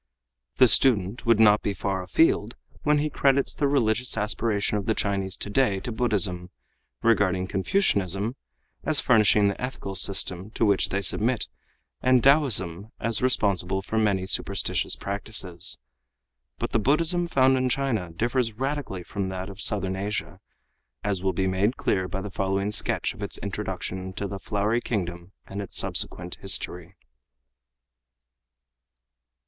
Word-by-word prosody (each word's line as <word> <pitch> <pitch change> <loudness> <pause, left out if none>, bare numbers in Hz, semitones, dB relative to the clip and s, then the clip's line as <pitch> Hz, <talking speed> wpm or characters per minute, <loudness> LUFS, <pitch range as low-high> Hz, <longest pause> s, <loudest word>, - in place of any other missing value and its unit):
The 130 - +6
student 115 -2 +3
would 115 -2 +4
not 105 -1 +6
be 100 - -2
far 95 0 -2
afield 105 - +2 0.3
when 150 0 +2
he 150 +1 0
credits 140 -1 +2
the 145 - 0
religious 125 -3 +1
aspirations 105 -1 0
of 100 - -6
the 110 - +1
Chinese 95 -2 -1
today 100 -1 0
to 120 - -4
Buddhism, 100 -7 +1 0.5
regarding 95 -5 +2
Confucianism 100 - 0 0.5
as 155 -2 +2
furnishing 105 -3 +4
the 100 - -3
ethical 125 -6 -5
system 95 0 -1
to 115 - +2
which 100 -2 +2
they 100 - -1
submit 115 +4 0 0.5
and 130 -1 +3
Taoism 110 - +3
as 115 0 0
responsible 95 -6 0
for 110 +3 -1
many 100 -4 +1
superstitious 95 - 0
practices. 100 -5 -1 0.8
But - - -4
the 115 - +2
Buddhism 165 - +2
found 135 -4 +3
in 130 0 +1
China 120 -9 -1
differs 120 +6 -1
radically 135 -6 -4
from 95 +1 -4
that 95 +1 -5
of 100 +1 -6
Southern 95 -2 -1
Asia, 100 +2 -4 0.6
as 100 -3 -1
will 95 0 +1
be 95 +2 -1
made 95 +6 0
clear 95 -1 0
by 95 +1 -4
the 100 0 -7
following 95 +1 -1
sketch - - 0
of - - -13
its - - -2
introduction 95 - -5
into 95 +2 -5
the 100 0 -6
Flowery 105 +4 -1
Kingdom 90 -4 -4
and 100 +1 -6
its 100 - -5
subsequent 90 0 -1
history. 90 -2 -2
105 Hz, 145 wpm, -25 LUFS, 95-120 Hz, 0.8 s, The